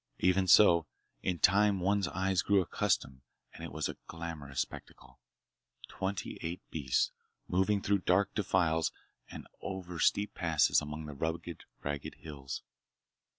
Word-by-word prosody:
Even 95 Hz, +1 st, +2 dB
so, 85 Hz, -6 st, +7 dB, 0.3 s
in 90 Hz, -2 st, -1 dB
time 100 Hz, +3 st, +4 dB
one's 100 Hz, 0 st, +1 dB
eyes 95 Hz, 0 st, 0 dB
grew 100 Hz, -1 st, +3 dB
accustomed 90 Hz, -8 st, -1 dB, 0.3 s
and -, -, -10 dB
it -, -, -6 dB
was 80 Hz, +1 st, -2 dB
a -, -, -6 dB
glamorous 80 Hz, -5 st, -4 dB
spectacle—twenty 95 Hz, +10 st, -8 dB
eight 85 Hz, +2 st, -4 dB
beasts 65 Hz, -6 st, +1 dB, 0.4 s
moving 95 Hz, +2 st, +1 dB
through 100 Hz, 0 st, +2 dB
dark 90 Hz, +2 st, +2 dB
defiles 85 Hz, -6 st, +1 dB, 0.4 s
and -, -, -9 dB, 0.2 s
over 90 Hz, -3 st, -5 dB
steep 100 Hz, +4 st, +2 dB
passes 80 Hz, -4 st, +3 dB
among 75 Hz, +1 st, -6 dB
the 75 Hz, -, -7 dB
rugged, 80 Hz, +3 st, -4 dB, 0.2 s
ragged 70 Hz, -1 st, -4 dB
hills. 70 Hz, -4 st, -7 dB
85 Hz, 130 wpm, -32 LUFS, 80-95 Hz, 0.4 s, so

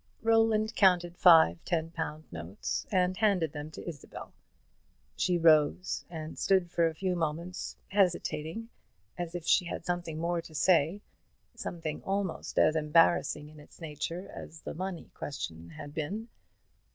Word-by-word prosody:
Roland 225 Hz, -1 st, +3 dB
counted 175 Hz, -3 st, +4 dB
five 160 Hz, -, +6 dB
ten 165 Hz, -1 st, -1 dB
pound 155 Hz, -2 st, -4 dB
notes 85 Hz, +3 st, -4 dB
and 185 Hz, -1 st, +2 dB
handed 185 Hz, -8 st, +2 dB
them 150 Hz, 0 st, -6 dB
to 155 Hz, -, -10 dB
Isabel. 155 Hz, -5 st, -8 dB, 0.8 s
She 180 Hz, -1 st, +1 dB
rose 160 Hz, +2 st, +3 dB
and 160 Hz, -2 st, -7 dB
stood 185 Hz, -3 st, +2 dB
for 170 Hz, -1 st, +3 dB
a 160 Hz, -, -4 dB
few 185 Hz, +2 st, -1 dB
moments, 170 Hz, +2 st, -3 dB
hesitating 180 Hz, +1 st, 0 dB, 0.5 s
as 175 Hz, -1 st, -5 dB
if 175 Hz, -2 st, -5 dB
she 180 Hz, -, +4 dB
had 170 Hz, -, -5 dB
something 175 Hz, -3 st, -2 dB
more 170 Hz, +1 st, -1 dB
to 160 Hz, -1 st, -13 dB
say, 175 Hz, +3 st, +3 dB, 0.5 s
something 160 Hz, -3 st, -5 dB
almost 195 Hz, -2 st, -3 dB
as 155 Hz, -, +5 dB
embarrassing 155 Hz, -1 st, +3 dB
in 155 Hz, 0 st, -14 dB
its 150 Hz, -, -17 dB
nature 165 Hz, +3 st, -5 dB
as 160 Hz, -, -9 dB
the -, -, -6 dB
money 185 Hz, 0 st, -5 dB
question 85 Hz, -, -6 dB
had 145 Hz, -, -9 dB
been. 200 Hz, +10 st, -4 dB
170 Hz, 145 wpm, -30 LUFS, 155-185 Hz, 0.8 s, five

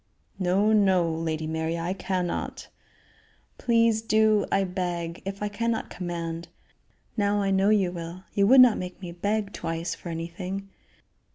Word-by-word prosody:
"No! 195 Hz, +4 st, +3 dB
no! 190 Hz, -5 st, +4 dB
Lady 160 Hz, -1 st, -2 dB
Mary, 160 Hz, +1 st, -2 dB
I 170 Hz, +2 st, -2 dB
cannot." 185 Hz, -2 st, -3 dB, 0.9 s
"Please 230 Hz, -2 st, +3 dB
do. 215 Hz, -2 st, +3 dB
I 195 Hz, -, +3 dB
beg 175 Hz, -2 st, -3 dB
if 195 Hz, +1 st, -4 dB
I -, -, +1 dB
cannot 230 Hz, +2 st, -2 dB
command. 170 Hz, -2 st, -4 dB, 0.7 s
Now 205 Hz, -1 st, +1 dB
I 195 Hz, -1 st, +1 dB
know 195 Hz, +1 st, +3 dB
you 200 Hz, -4 st, +3 dB
will; 170 Hz, +1 st, -7 dB
you 200 Hz, -1 st, +3 dB
would 260 Hz, +3 st, +9 dB
not 245 Hz, -3 st, +6 dB
make 180 Hz, -1 st, -6 dB
me 180 Hz, -3 st, -7 dB
beg 205 Hz, +3 st, -2 dB
twice 165 Hz, +1 st, -3 dB
for 175 Hz, -, -8 dB
anything?" 180 Hz, +4 st, -5 dB
185 Hz, 150 wpm, -26 LUFS, 170-205 Hz, 0.9 s, would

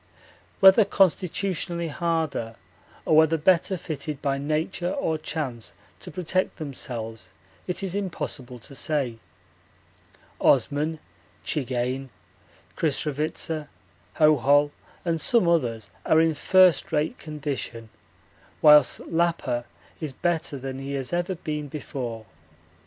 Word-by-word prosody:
Whether 195 Hz, +3 st, +8 dB
constitutionally 180 Hz, -2 st, 0 dB
harder 160 Hz, -8 st, -2 dB, 0.5 s
or 155 Hz, -, +3 dB
whether 160 Hz, +1 st, +5 dB
better 185 Hz, +3 st, +3 dB
fitted 150 Hz, -3 st, -5 dB
by 140 Hz, -1 st, -1 dB
nature 155 Hz, +5 st, -1 dB
or 160 Hz, -3 st, -1 dB
chance 140 Hz, -8 st, -4 dB, 0.2 s
to -, -, -9 dB
protect 185 Hz, +1 st, -1 dB
themselves 115 Hz, -, -6 dB, 0.4 s
it 180 Hz, +2 st, -3 dB
is 190 Hz, -2 st, -2 dB
impossible 150 Hz, -10 st, -4 dB
to 120 Hz, +4 st, -11 dB
say 135 Hz, -5 st, -2 dB, 1.2 s
Osman, 155 Hz, +3 st, +2 dB, 0.5 s
Czigane, 130 Hz, -1 st, -2 dB, 0.7 s
Krisravitsa, 155 Hz, +1 st, -1 dB, 0.5 s
Hohol, 145 Hz, -1 st, +4 dB, 0.3 s
and 165 Hz, -2 st, 0 dB
some 235 Hz, -7 st, +3 dB
others 115 Hz, -, 0 dB
are 160 Hz, -, +4 dB
in 160 Hz, 0 st, +3 dB
first 185 Hz, +1 st, +4 dB
rate 150 Hz, 0 st, 0 dB
condition, 140 Hz, -7 st, -5 dB, 0.7 s
whilst 150 Hz, -1 st, +6 dB
Lappa 165 Hz, -8 st, 0 dB, 0.3 s
is 155 Hz, -4 st, -4 dB
better 160 Hz, -1 st, -1 dB
than 135 Hz, 0 st, -6 dB
he 135 Hz, +1 st, -5 dB
has 135 Hz, +2 st, -3 dB
ever 175 Hz, +2 st, 0 dB
been 150 Hz, -2 st, -4 dB
before. 125 Hz, -6 st, -6 dB
150 Hz, 110 wpm, -25 LUFS, 135-170 Hz, 1.2 s, Whether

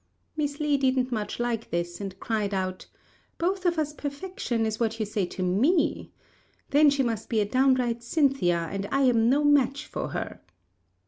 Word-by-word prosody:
Miss 295 Hz, -1 st, -2 dB
Li 300 Hz, -2 st, +2 dB
didn't 260 Hz, -1 st, +1 dB
much 215 Hz, -1 st, -3 dB
like 240 Hz, -2 st, -2 dB
this, 175 Hz, +2 st, -3 dB
and 195 Hz, -1 st, -6 dB
cried 210 Hz, -3 st, -1 dB
out, 185 Hz, -1 st, -3 dB, 0.5 s
"Both 370 Hz, +2 st, 0 dB
of 340 Hz, -1 st, +1 dB
us 300 Hz, -1 st, -1 dB
perfection 285 Hz, -6 st, -3 dB
is 220 Hz, 0 st, -2 dB
what 225 Hz, -1 st, -1 dB
you 215 Hz, -, 0 dB
say 205 Hz, -3 st, -1 dB
to 185 Hz, -, -5 dB
me. 275 Hz, -, +1 dB, 0.6 s
Then 295 Hz, +1 st, +6 dB
she 280 Hz, -1 st, +1 dB
must 225 Hz, -3 st, -3 dB
be 225 Hz, -, +1 dB
a 210 Hz, -, +2 dB
downright 255 Hz, 0 st, +2 dB
Cynthia, 235 Hz, -, +1 dB
and 195 Hz, 0 st, -3 dB
I 275 Hz, -, +2 dB
am 235 Hz, -3 st, +4 dB
no 285 Hz, +3 st, +3 dB
match 285 Hz, 0 st, +3 dB
for -, -, -4 dB
her." -, -, -5 dB
245 Hz, 180 wpm, -27 LUFS, 210-285 Hz, 0.6 s, Then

